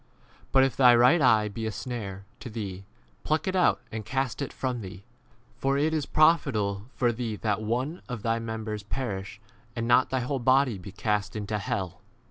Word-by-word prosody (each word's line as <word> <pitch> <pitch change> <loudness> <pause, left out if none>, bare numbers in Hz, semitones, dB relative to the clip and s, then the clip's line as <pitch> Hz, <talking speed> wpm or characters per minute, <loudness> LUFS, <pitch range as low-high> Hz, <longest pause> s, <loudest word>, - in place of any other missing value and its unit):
But 135 - +5
if 135 - +1
thy 125 -2 +7
right 125 +8 +5
eye 110 -5 +5
be 110 +2 -4
a - - -2
snare 100 -2 -6
v 110 +4 -34
to 120 - -7
thee, 100 -4 -6 0.4
pluck 155 +2 0
it 190 - 0
out 180 - +3
and 110 0 -4
cast 135 +2 -2
it 140 - -3
from 125 -3 -3
thee: 95 0 -9 0.6
for 135 +1 +1
it 155 +3 +1
is 150 -3 -1
profitable 110 -11 +2
for 120 -2 +2
thee 115 -2 -3
that 105 0 -1
one 125 +10 -2
of 120 -4 -5
thy 115 0 +1
members 110 -2 -4
perish, 100 -2 -4 0.4
and 115 -1 -2
not 120 +1 +4
thy 130 -1 0
whole 135 +2 -2
body 130 -3 +3
be 95 +2 -9
cast 105 0 -1
30 110 - -4
into 105 +1 -2
hell. 95 -2 -3
115 Hz, 200 wpm, -27 LUFS, 105-130 Hz, 0.6 s, thy